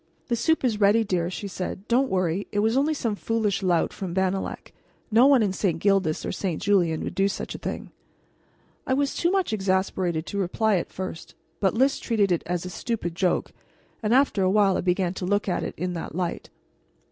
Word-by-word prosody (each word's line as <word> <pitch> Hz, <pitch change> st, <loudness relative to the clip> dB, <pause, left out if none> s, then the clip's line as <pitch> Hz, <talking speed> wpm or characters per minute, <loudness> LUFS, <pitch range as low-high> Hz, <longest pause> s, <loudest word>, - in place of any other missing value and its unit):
"The 240 Hz, -, +2 dB
soup 295 Hz, +8 st, +1 dB
is 220 Hz, -4 st, 0 dB
ready, 210 Hz, +2 st, +4 dB
dear," 180 Hz, -4 st, -1 dB
she 200 Hz, +2 st, -5 dB
said. 190 Hz, +1 st, -5 dB
"Don't 260 Hz, +3 st, +2 dB
worry; 185 Hz, 0 st, 0 dB
it -, -, -4 dB
was 220 Hz, +3 st, +2 dB
only 295 Hz, +4 st, +2 dB
some 230 Hz, -6 st, -1 dB
foolish 215 Hz, -2 st, -1 dB
lout 175 Hz, -3 st, +1 dB
from 180 Hz, -3 st, -5 dB
Bannalec. 190 Hz, 0 st, -2 dB, 0.4 s
No 235 Hz, +5 st, +6 dB
one 270 Hz, -5 st, +5 dB
in 195 Hz, -3 st, 0 dB
St. 185 Hz, -4 st, 0 dB
Gildas 195 Hz, -4 st, +1 dB
or -, -, -2 dB
St. 180 Hz, -5 st, -2 dB
Julien 175 Hz, -6 st, +2 dB
would -, -, -4 dB
do 195 Hz, 0 st, +2 dB
such 200 Hz, -, -4 dB
a -, -, -7 dB
thing." -, -, -5 dB, 1.0 s
I 260 Hz, -, +2 dB
was 280 Hz, 0 st, 0 dB
too 340 Hz, -, +1 dB
much 375 Hz, -, 0 dB
exasperated 190 Hz, -4 st, 0 dB
to 200 Hz, -, -4 dB
reply 200 Hz, +2 st, +1 dB
at 170 Hz, -, -4 dB
first, 185 Hz, -3 st, -7 dB, 0.2 s
but 195 Hz, 0 st, +1 dB
Lys 265 Hz, +4 st, +2 dB
treated 210 Hz, -5 st, +1 dB
it 175 Hz, -, +2 dB
as 175 Hz, 0 st, -2 dB
a -, -, -4 dB
stupid 215 Hz, -5 st, -3 dB
joke, 180 Hz, +1 st, 0 dB, 0.5 s
and 215 Hz, -1 st, -1 dB
after 260 Hz, -5 st, +3 dB
a 185 Hz, -, +3 dB
while 195 Hz, -1 st, +4 dB
I -, -, 0 dB
began 180 Hz, 0 st, 0 dB
to 190 Hz, -, -6 dB
look 205 Hz, +2 st, +1 dB
at 180 Hz, -, 0 dB
it -, -, -5 dB
in 180 Hz, +2 st, -2 dB
that 165 Hz, -2 st, -6 dB
light. 180 Hz, -1 st, -3 dB
195 Hz, 210 wpm, -25 LUFS, 180-225 Hz, 1.0 s, No